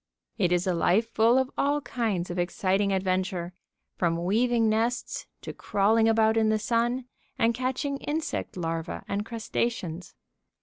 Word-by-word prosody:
It 175 - +2
is 180 0 +2
a 185 - +1
life 200 +7 +2
full 230 +3 +4
of 260 0 +1
all 290 +1 +2
kinds 215 -10 -2
of 175 - -3
exciting 190 +3 +1
adventure, 185 -2 -1 0.4
from 170 -1 0
weaving 230 +3 +2
nests 225 +3 -1
to - - -7
crawling 220 +3 +2
about 220 0 +3
in 220 -1 +3
the 215 - +3
sun 235 +3 0 0.3
and 230 +1 +3
catching 260 +3 -2
insect 305 +3 -3
larvæ 165 -1 -3
and 200 +1 -1
crustaceans. 215 -6 -3
220 Hz, 145 wpm, -27 LUFS, 185-235 Hz, 0.4 s, full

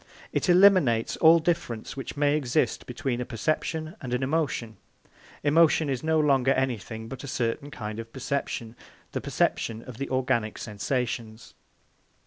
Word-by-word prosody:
It - - 0
eliminates 175 - +5
all 165 +1 +7
difference 160 -9 -2
which 135 +1 -6
may 145 0 +3
exist 150 0 0
between 130 -7 -2
a - - 0
perception 155 - -2
and 125 -3 -2
an 125 - -1
emotion. 130 -6 -1 0.7
Emotion 155 0 +4
is 130 - -2
no 160 0 +2
longer 140 -3 +3
anything 115 -4 -2
but 135 +3 -8
a - - -6
certain 120 +3 -2
kind 110 -5 -6
of 115 0 -8
perception, 130 -3 -3 0.4
the - - -3
perception 115 0 -1
of 125 -3 -10
the 140 - -3
organic 120 -4 0
sensations. 115 +1 -4
130 Hz, 145 wpm, -27 LUFS, 115-150 Hz, 0.7 s, all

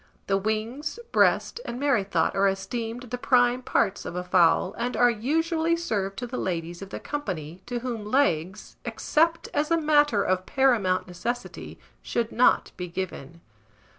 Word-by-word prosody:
The 195 - +1
wings, 225 - -3
breast, - - +2
and 240 - -5
merrythought 245 -9 +1
are 195 0 +3
esteemed 225 +5 -3
the 245 - -3
prime 245 -1 +3
parts 200 -5 0
of - - -6
a 180 - -2
fowl, 180 0 +3
and 245 +1 -2
are 245 0 +5
usually 325 - 0
served 200 - -2
to 245 - -3
the 250 +1 -5
ladies 170 -1 -3
of 195 - -8
the - - -6
company, 180 - -5
to 245 -1 -3
whom 235 -4 -4
legs, 210 - 0
except 330 +2 +1
as 295 +1 0
a 335 - +3
matter 295 -9 +3
of 185 0 0
paramount 225 -10 +2
necessity, 235 +8 -5 0.2
should 235 -1 -2
not 250 - +3
be 180 - -4
given. 170 -3 -6
230 Hz, 160 wpm, -26 LUFS, 190-265 Hz, 0.2 s, are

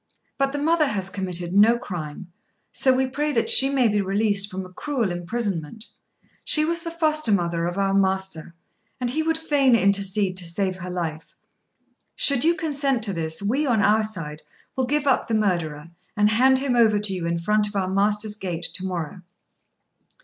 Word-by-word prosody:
But 275 0 +1
the 290 - -4
mother 310 +1 +2
has 195 -5 -3
committed 180 -3 -4
no 215 +4 +5
crime, 175 -4 -7 0.4
so 260 - +3
we 260 +1 +1
pray 295 +3 -2
that 460 - +2
she 270 - +7
may 265 -3 +2
be 210 -1 +1
released 200 +1 +3
from 190 -1 -6
a 185 - -14
cruel 245 -5 -2
imprisonment: 185 0 -4 0.6
she 305 0 +2
was 335 +1 -1
the 335 - -5
foster 310 -6 +1
mother 170 -3 0
of 175 +2 -5
our 195 -1 0
master, 190 -4 -1 0.4
and 245 -1 -2
he 315 - -1
would 325 0 0
fain 285 -6 +2
intercede 200 -1 +1
to 180 -2 -3
save 185 +2 -2
her 180 0 -7
life. 165 -3 -5 0.8
Should 280 -3 +3
you 335 +2 +3
consent 280 -6 -1
to 200 -3 -1
this, 160 +1 -2
we, 265 +9 0
on 225 -5 +2
our 215 +2 +3
side, 165 -8 -5 0.3
will 260 -1 0
give 295 +2 0
up 270 - +1
the 225 - -1
murderer, 170 -7 -2 0.3
and 210 0 +3
hand 260 +4 +4
him 265 -2 -1
over 225 -3 +4
to 205 -1 0
you 175 -3 -3
in 170 0 -1
front 210 +5 0
of 205 - -10
our 190 -2 -1
master's 205 +2 +1
gate 180 -5 -5
to 185 - -5
morrow." 180 -2 -5
205 Hz, 190 wpm, -23 LUFS, 180-260 Hz, 0.8 s, she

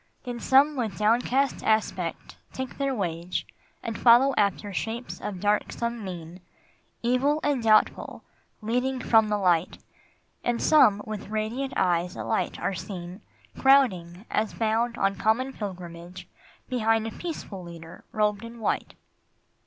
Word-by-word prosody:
Then 245 -2 -5
some 275 +5 +4
with 230 -6 -3
downcast 245 +5 +1
aspect 220 0 -1 0.2
take 260 +1 -6
their 275 -1 0
wage 175 -3 -3 0.4
And 225 - -4
follow 250 +3 +6
after 200 0 0
shapes 225 +6 -4
of 190 -3 -5
darksome 220 +3 -1
mien, 175 -2 -7 0.6
Evil 260 +5 +2
and 285 -4 +1
doubtful, 215 -1 +2 0.4
leading 250 +4 0
from 220 -3 +4
the 210 - +1
light; 180 -3 +1 0.7
And 240 -1 0
some 210 -10 +5
with 215 -2 -6
radiant 220 +6 -2
eyes 175 -1 +1
alight 110 0 -2
are - - -1
seen, 180 +1 -7 0.4
Crowding, 200 -9 +3
as 215 0 -1
bound 230 +2 0
on 195 0 +1
common 250 +6 +1
pilgrimage, 180 -3 -8 0.4
Behind 225 -3 +1
a 225 - -4
peaceful 220 - -6
Leader 170 -1 -11
robed 210 0 0
in 230 0 -9
white. 220 - -2
220 Hz, 130 wpm, -26 LUFS, 185-245 Hz, 0.7 s, follow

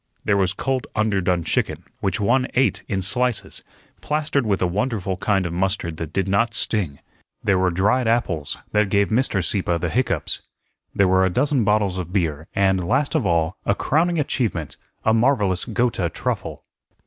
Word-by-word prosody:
There 100 - +3
was 95 -1 +1
cold 130 +3 -2
underdone 95 -5 +1
chicken, - - -1 0.2
which 95 -1 -1
one 125 +5 +2
ate 110 -8 +2
in 95 -2 -2
slices, 110 -1 -1 0.4
plastered 150 -4 0
with 100 -2 +1
a - - +1
wonderful 95 0 -1
kind 95 0 +1
of 85 - -3
mustard 90 -3 -1
that 80 -1 -5
did 95 +2 -1
not 115 +3 +1
sting. 90 -13 0 0.5
There 95 -2 +2
were 95 0 +3
dried 105 +8 +1
apples, 110 -11 0
that 105 -1 +2
gave 100 0 +2
Mr. 110 -6 +1
Sieppe 90 -1 +1
the 85 -1 -2
hiccoughs. 125 +6 -1 0.5
There 100 - +4
were 95 0 +4
a 95 - +3
dozen 130 +5 +1
bottles 100 -3 +1
of 90 -1 -5
beer, 80 -5 -1
and, 95 -2 +2
last 135 - +1
of 145 -11 +1
all, 85 0 +1
a 100 - +1
crowning 170 +7 +1
achievement, 115 - -1 0.3
a 110 - +4
marvellous 110 -6 +2
Gotha 115 -8 0
truffle. - - -4
100 Hz, 170 wpm, -22 LUFS, 90-120 Hz, 0.5 s, There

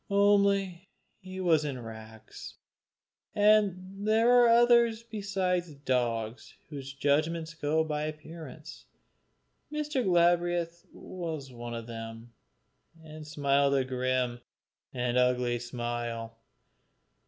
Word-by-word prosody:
Only 200 -2 +2 0.3
he 185 0 -9
was 165 -5 +3
in 140 -4 -4
rags, 110 -1 -10 0.8
and 205 -2 +2
there 225 +2 +4
are 245 -1 +6
others 235 -1 +4
besides 190 -7 -2
dogs 120 -4 -2
whose 140 -3 -7
judgments 155 +4 0
go 160 0 0
by 150 -1 -2
appearance. 155 -1 -9 0.9
Mr. 300 -3 -1
Galbraith 175 -2 +1
was 160 -7 -7
one 120 0 -6
of 115 -1 -6
them, 115 0 -8 0.7
and 155 -1 -10
smiled 140 -2 +2
a 135 - +2
grim, 130 -1 -1 0.5
an 125 -1 -1
ugly 125 -1 +2
smile. 120 -1 -4
155 Hz, 100 wpm, -29 LUFS, 125-190 Hz, 0.9 s, are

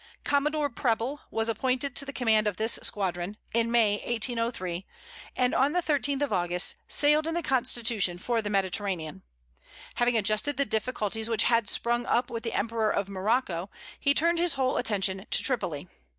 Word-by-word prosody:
Commodore 295 +1 +1
Preble 240 +4 -1
was 225 0 -1
appointed 255 +4 -1
to 285 - 0
the 280 - -5
command 220 -5 +2
of 205 - -2
this 220 +1 +2
squadron, 190 0 -2 0.2
in 230 0 +2
May 225 -3 +3
1803, 225 -6 -2 0.5
and 250 0 +1
on 275 +3 +2
the 355 - +2
13th 285 -3 +1
of 280 - -1
August, 175 -1 +2
sailed 300 +2 +3
in 325 - -2
the 345 - -1
Constitution 235 -8 0
for 230 +5 -1
the 210 - -4
Mediterranean. 190 - -1 0.8
Having 240 -1 +2
adjusted 215 +7 +1
the 280 - +2
difficulties 220 -1 -2
which 225 - +2
had 230 -3 +2
sprung 240 +1 +1
up 245 +1 +1
with 230 -1 -4
the 230 -1 -4
emperor 225 0 0
of 200 -1 -1
Morocco, 195 -2 -1 0.3
he 280 0 +2
turned 335 +3 +2
his 345 -1 +3
whole 260 -1 0
attention 195 -3 -1
to - - +2
Tripoli. 180 - -2
230 Hz, 170 wpm, -27 LUFS, 205-265 Hz, 0.8 s, May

